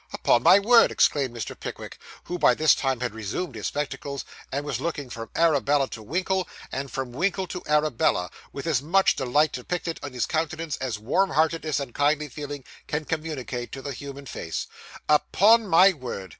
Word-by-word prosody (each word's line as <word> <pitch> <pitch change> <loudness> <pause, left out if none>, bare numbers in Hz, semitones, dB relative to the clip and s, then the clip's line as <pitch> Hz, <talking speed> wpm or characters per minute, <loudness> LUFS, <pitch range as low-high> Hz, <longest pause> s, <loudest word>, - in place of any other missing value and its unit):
Upon 120 - +3
my 175 +8 +7
word,' 230 +4 +5
exclaimed 140 -4 +2
Mr. 110 - -5
Pickwick, - - -8 0.2
who 175 0 -5
by - - +5
this 155 0 +5
time 135 -3 -1
had 125 -3 -2
resumed 110 - -4
his 110 -2 -4
spectacles, 140 -1 -4 0.3
and 140 +2 -2
was 150 - -3
looking 145 -6 -4
from 115 0 -7
Arabella 145 -4 +3
to 110 - -8
Winkle, 185 - -1 0.2
and 135 +1 -4
from 130 -2 -4
Winkle 190 +8 -1
to 180 0 -6
Arabella, 150 - +1 0.2
with 140 - -7
as 155 -6 +1
much 190 +6 +3
delight 145 +3 +2
depicted 165 +6 -4
in 140 -3 -7
his 125 - 0
countenance 160 -1 -2
as 130 -4 -3
warmheartedness 160 - +1
and 135 -4 -6
kindly 150 +1 +1
feeling 145 0 -7 0.2
can 150 +1 -2
communicate 145 -7 -4
to 135 - -7
the 140 - -4
human 140 +1 -8
face 80 -9 -4 0.4
'upon 210 +9 +4
my 190 +2 +6
word! 120 - -7
145 Hz, 175 wpm, -25 LUFS, 130-165 Hz, 0.4 s, my